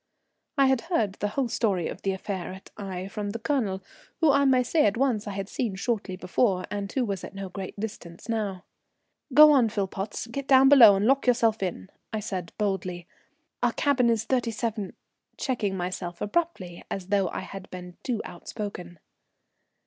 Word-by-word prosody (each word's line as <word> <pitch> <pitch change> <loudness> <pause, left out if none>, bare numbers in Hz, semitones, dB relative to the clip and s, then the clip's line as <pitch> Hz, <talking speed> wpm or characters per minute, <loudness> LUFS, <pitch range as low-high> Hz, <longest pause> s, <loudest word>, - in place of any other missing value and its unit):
I 275 - +6
had 265 -2 +3
heard 220 - +1
the 205 - 0
whole 255 +5 -1
story 205 -7 0
of - - -7
the 195 - 0
affair 190 -1 -4
at 190 - -13
Aix 190 -1 -5
from 205 -1 -3
the 215 - -3
Colonel, 220 -7 -1 0.4
who 320 -3 +5
I 280 0 +4
may 255 -2 +4
say 300 +1 +3
at 205 - 0
once 240 -5 +1
I 205 - -3
had 195 0 -4
seen 215 -2 -2
shortly 205 -2 -2
before, 185 +1 +1
and 200 -1 -3
who 260 -3 0
was 200 -4 -3
at - - -8
no 195 -1 -5
great 195 +1 -7
distance 200 -4 -7
now. 210 -5 -2 0.7
"Go 300 +3 +9
on, 255 -6 +4
Philpotts, 200 0 -3
get 275 +2 -4
down 270 0 +7
below 235 -8 +9
and 195 +2 +1
lock 270 +2 +3
yourself 230 -3 +3
in," 170 - -4 0.2
I 220 - -2
said 185 -4 -4
boldly. 185 -4 -2 0.6
"Our - - +2
cabin 265 -5 +2
is 225 -2 +2
thirty 245 0 0
seven 220 -3 -3 0.2
" - - -48
checking 210 -8 -1
myself 175 -1 -4
abruptly 210 - -2
as 190 -1 -5
though 195 -3 +2
I - - -4
had 195 0 -9
been 180 -1 -9
too 235 -4 -2
outspoken. 180 -1 -7
205 Hz, 185 wpm, -27 LUFS, 190-245 Hz, 0.7 s, Go